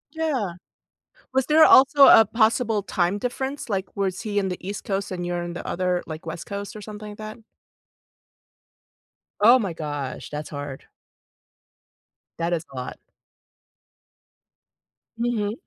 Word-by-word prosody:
Yeah. 265 - -1 0.8
Was 265 -1 +1
there 315 +1 +6
also 275 +1 +7
a 225 - +9
possible 225 -1 +1
time 180 +2 0
difference? 265 +4 -4
Like, 195 -3 -1
was 190 -2 -1
he 210 -2 -2
in 195 -1 0
the 180 - -4
East 205 - -5
Coast 195 -1 -2
and 175 -2 -4
you're 175 0 -2
in 175 0 -5
the - - -7
other, 180 0 -1
like, 155 +1 -8
West 160 +1 -6
Coast, 200 +2 -6
or - - -7
something 210 0 -9
like 205 - -11
that? 215 +1 -8 2.0
Oh 240 +5 +7
my 195 -6 -2
gosh. 145 -4 -5
That's 150 0 -6
hard. 145 -2 -7 1.5
That 170 +1 0
is 165 -2 -1
a - - -11
lot. 125 0 -6 2.2
Mhm. 230 -3 -1
200 Hz, 140 wpm, -24 LUFS, 175-230 Hz, 2.2 s, a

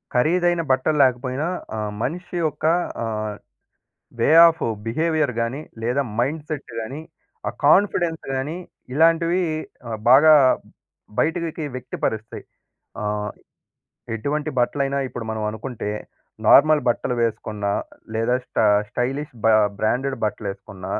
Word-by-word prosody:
ఖరీదైన 175 +6 +2
బట్టలు 140 +4 +2
లేకపోయినా 130 +4 0 0.3
ఆ - - -2 0.2
మనిషి 175 +7 -4
యొక్క 155 -1 -2 0.4
ఆహ్, 110 -2 -3 0.9
వే - - +3 0.2
ఆఫ్ 165 -2 -3 0.2
బిహేవియర్ 155 +2 +1
గాని, 115 +5 -2 0.2
లేదా 125 +5 +1 0.2
మైండ్‌సెట్ 150 +2 -3
గాని, 130 +7 -6 0.5
ఆ - - -1 0.2
కాన్‌ఫిడెన్స్ 175 -1 +3
గాని, 145 +5 -3 0.4
ఇలాంటివి 165 +3 +3 0.5
ఆహ్, 110 -2 -4
బాగా 155 +4 +8 0.8
బయటకి 165 0 -1
వ్యక్తిపరుస్తాయి. 110 -3 -4 0.6
ఆహ్, 105 0 -2 0.9
ఎటువంటి 150 +7 -2
బట్టలైనా 140 +2 0
ఇప్పుడు 120 -2 -7
మనం 110 -1 -3
అనుకుంటే 110 0 -5 0.6
నార్మల్ 155 +1 +7
బట్టలు 120 +1 -1
వేసుకున్న, 110 -2 -3 0.5
లేదా 115 +3 +1
స్ట - - -16 0.3
స్టైలిష్ 135 +5 -3
బా 115 - +6 0.3
బ్రాండెడ్ 130 +5 0
బట్టలెసుకున్న 100 -3 -6
135 Hz, 105 wpm, -22 LUFS, 115-155 Hz, 0.9 s, బాగా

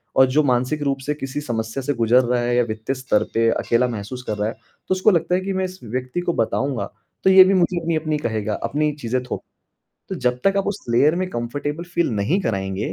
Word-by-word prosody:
और 130 - +7
जो 145 +4 +2
मानसिक 130 +3 +1
रूप 140 -1 0
से 150 - 0
किसी 145 0 -5
समस्या 115 -1 -3
से 145 +2 0
गुज़र 115 +1 +4
रहा 120 0 +1
है 120 0 0
या 120 - +4
वित्तीय 110 +3 -3
स्तर 130 -5 +1
पे 115 0 +3
अकेला 120 +2 +1
महसूस 120 +3 -6
कर 105 - -2
रहा 105 - 0
है 115 - -3 0.3
तो - - +2
उसको 185 +3 +4
लगता 175 0 +1
है 185 - 0
कि 195 +1 -3
मैं 190 0 0
इस 185 0 -8
व्यक्ति 125 +7 -3
को 175 -1 -1
बताऊँगा 130 +2 -1 0.4
तो 190 - +5
ये 190 0 +10
भी 190 +1 +3
मुझे 180 -1 +2
अपनी-अपनी 155 -2 -1
कहेगा, 110 -6 -2
अपनी 150 +1 0
चीज़ें 125 +2 -1
थोप 125 - -5 0.7
तो - - -3
जब 125 0 0
तक 195 0 +3
आप 195 - +1
उस 205 0 -2
लेयर 145 +7 +4
में 185 0 -1
कंफर्टेबल 145 +7 -3
फ़ील 170 -1 0
नहीं 105 - +1
कराएँगे, 95 -3 -2
130 Hz, 230 wpm, -22 LUFS, 115-165 Hz, 0.7 s, ये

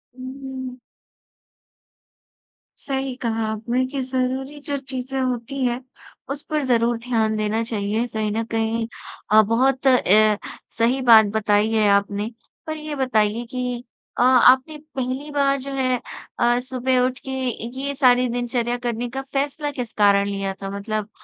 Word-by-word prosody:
हुँ, 255 0 -7
हुँ, 265 - -6 0.2
हुँ। 250 0 -8 2.0
सही 270 -2 -3
कहा 225 -2 -1
आपने 235 +4 -1
कि 275 - -3
ज़रूरी 260 +2 -2
जो 290 -3 -2
चीज़ें 265 0 -5
होती 255 +1 -2
हैं, 245 +1 -1 0.5
उस 280 +1 -4
पर 305 -1 0
ज़रूर 235 -2 +2
ध्यान 220 -3 +1
देना 215 +1 0
चाहिए 220 0 -1
कहीं 215 -2 -2
न 225 +2 -1
कहीं, 225 0 0 0.4
अ, 215 - +8
बहुत 260 +5 +1
अ, 215 -4 +5 0.4
सही 240 +4 +2
बात 225 -3 +8
बताई 210 +1 +2
है। 215 -2 +3
आपने 200 +2 +1 0.4
पर 315 0 -3
ये 305 -1 -5
बताइए 235 -3 +1
कि 250 -2 -3 0.4
अ, - - +3
आपने 260 +4 +5 0.2
पहली 260 +3 -3
बार 275 -1 +2
जो 275 +1 -6
है, 255 -2 +1 0.4
अ, 240 +1 +3
सुबह 255 0 0
उठ 255 0 -3
के 265 - -3 0.5
ये 280 +1 -2
सारे 250 -2 +4
दिनचर्या 240 0 -1
करने 240 0 -3
का 265 +2 -4
फ़ैसला 285 +2 -2
किस 245 -4 -5
कारण 200 -1 +5
लिया 195 -1 -2
था? 195 - -4
मतलब, 210 +1 -3
245 Hz, 155 wpm, -22 LUFS, 220-265 Hz, 2.0 s, अ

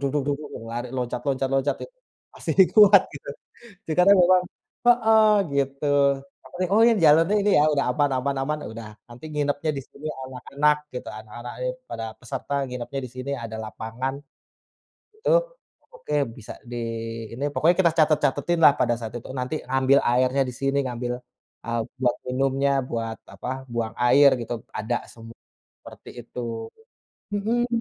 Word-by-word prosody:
dug 145 - +1
dug 145 -1 0
dug, 150 - -10 0.2
lari 120 +1 -4
loncat 125 -1 -2
loncat 135 0 0
loncat 135 +1 +1
ya, - - -12 0.5
masih - - -3 0.2
kuat 205 -3 +8
gitu. 140 - -11 0.6
sekarang 180 +5 +5
memang 180 +1 +5 0.4
heeh 220 -3 +5 0.3
gitu, 140 +1 -1 0.6
apa - - -16
tadi 185 - +2
oh 225 - +6
ya, 235 - +5
jalannya 165 +7 +5
ini 205 - +2
ya, - - +5
udah 140 - +1
aman 145 -1 +1
aman 140 +1 -2
aman, 150 +2 -1
udah 110 -1 -8 0.2
nanti 120 +5 -13
nginepnya 145 +1 0
di - - -6
sini 150 +2 -10 0.2
anak-anak 140 +3 0 0.2
gitu, 125 - -6
anak-anak 120 +3 -9
itu 125 - 0 0.2
para 115 -1 -4 0.2
peserta 135 +3 -5
nginepnya 125 +2 -5
di - - -14
sini, 130 +2 -5
ada 110 -1 -6
lapangan, 115 +5 -5 1.0
itu, 440 - -1 0.6
oke, 315 - -7 0.2
bisa 110 - -9 0.2
di - - -4 0.6
ini 135 +4 -5
pokoknya 170 +3 +3
kita 170 -2 +4
catat-catatin 155 +2 +1
lah 140 - +8
pada 120 - +2
saat 110 -1 -6
itu, 120 - -11
nanti 125 +5 -2
ngambil 135 +1 +4
airnya 130 +2 +2
di - - -7
sini, 135 +1 +1
ngambil, 120 0 -3 0.5
eee, 115 0 -1 0.2
buat 125 -2 +2
minumnya, 135 +2 +1 0.2
buat 115 -1 -3 0.2
apa, - - -8 0.3
buang 115 -1 -2
air 140 +3 +7
gitu, 115 - -4 0.3
ada 115 +3 -1 0.2
semua 115 0 -12 0.5
seperti - - -12
itu. 125 - -8 0.9
Mhm. 230 +4 0
135 Hz, 160 wpm, -24 LUFS, 120-150 Hz, 1.0 s, kuat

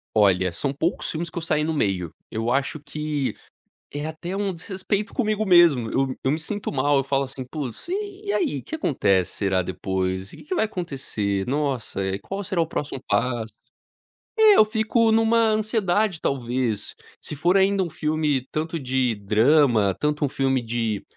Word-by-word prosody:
Olha, 95 -4 +4
são 110 +11 -2
poucos 160 +5 -1
filmes 170 +2 -3
que - - -10
eu - - -7
saí 155 -2 0
no 160 +1 -1
meio, 95 - -1 0.2
eu 115 +2 -2
acho 140 +4 0
que 150 -4 -3 0.6
é 145 +1 -4
até 170 +4 -5
um 200 -2 -1
desrespeito 195 +4 -3
comigo 215 -3 0
mesmo, 170 - +5
eu 135 -1 0
eu 130 - +1
me 155 - +1
sinto 205 +5 -3
mal, 145 +1 +2
eu 135 - +2
falo 135 0 0
assim: 135 0 -6
"Putz 130 - -5
e 405 +1 -4
e 405 - 0
aí 335 -7 0
o - - -12
que 315 - -5
acontece 100 - +1
será 95 -2 +1
depois? 95 +1 -3
E - - -12
o - - -14
que - - -14
que 370 - 0
vai 325 - +2
acontecer? 130 - -2
Nossa, 135 -7 -2
e 95 +1 -2
qual 195 +1 -5
será 185 -3 0
o 165 - 0
próximo 145 -4 -4
passo?". 120 -3 0 0.9
É, 435 -2 +7
eu 215 - +7
fico 220 +1 +2
numa 225 +1 +3
ansiedade 215 -4 +1
talvez, 125 -4 0 0.3
se - - -4
for 175 +6 +2
ainda 195 0 +3
um 175 - -2
filme 150 -4 -1
tanto 160 +2 -2
de 130 -3 0
drama, 110 +1 +3
tanto 150 0 0
um - - -3
filme 135 -1 0
de 115 -3 -2
145 Hz, 185 wpm, -24 LUFS, 120-190 Hz, 0.9 s, É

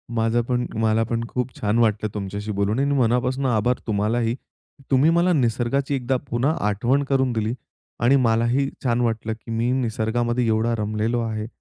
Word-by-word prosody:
माझं 115 +1 +2
पण 125 -1 0
मला 110 0 +2
पण 115 +1 -2
खूप 125 +1 -2
छान 105 -3 0
वाटलं 110 -1 +1
तुमच्याशी 100 +1 -4
बोलून 100 +3 0
आणि 140 +1 +1
मनापासून 125 +2 +1
आभार 120 0 +1
तुम्हालाही. 115 +3 0 0.6
तुम्ही 135 +4 +5
मला 170 +2 +3
निसर्गाची 130 +1 0
एकदा 130 0 0
पुन्हा 120 +5 +1 0.2
आठवण 120 +7 +1
करून 135 -2 +1
दिली 110 0 -1 0.5
आणि 125 +4 +5
मलाही 120 +2 +2
छान 120 -2 +1
वाटलं 110 -2 -1
की 115 +1 -11
मी 115 +2 0
निसर्गामध्ये 120 0 0
एवढा 110 +1 +1
रमलेलो 110 +2 -1
आहे. 110 -1 -3
120 Hz, 160 wpm, -23 LUFS, 110-125 Hz, 0.6 s, तुम्ही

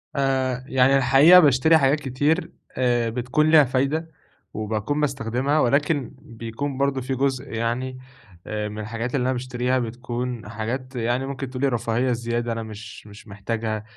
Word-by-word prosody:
آآ 130 -2 0
يعني 130 +1 +4
الحقيقة 135 +7 +7
باشتري 150 +1 +5
حاجات 140 0 +2
كتير، 145 +5 -1 0.3
آآ 120 -2 +1
بتكون 125 +6 0
ليها 155 -2 +8
فايدة، 140 +5 -1 0.4
وباكون 110 +7 -2
باستخدمها، 135 +1 0
ولكن 140 +1 +1
بيكون 115 +4 -6
برضه 140 -1 0
في 130 +1 -3
جزء 135 0 -1
يعني 120 +3 -2 0.5
آآ 105 0 -3
من 105 +1 -7
الحاجات 115 +4 -4
اللي 125 - +1
أنا 130 - +1
باشتريها، 125 0 -1
بتكون 120 -1 -5
حاجات 125 +4 -5
يعني 120 +2 -1
ممكن 135 -1 -5
تقولي 130 +2 -1
رفاهية 120 +1 0
زيادة 120 0 -2
أنا 115 0 -3
مش 110 0 -10
مش 105 +1 -14
محتاجها. 110 +2 -4
125 Hz, 150 wpm, -23 LUFS, 115-135 Hz, 0.5 s, ليها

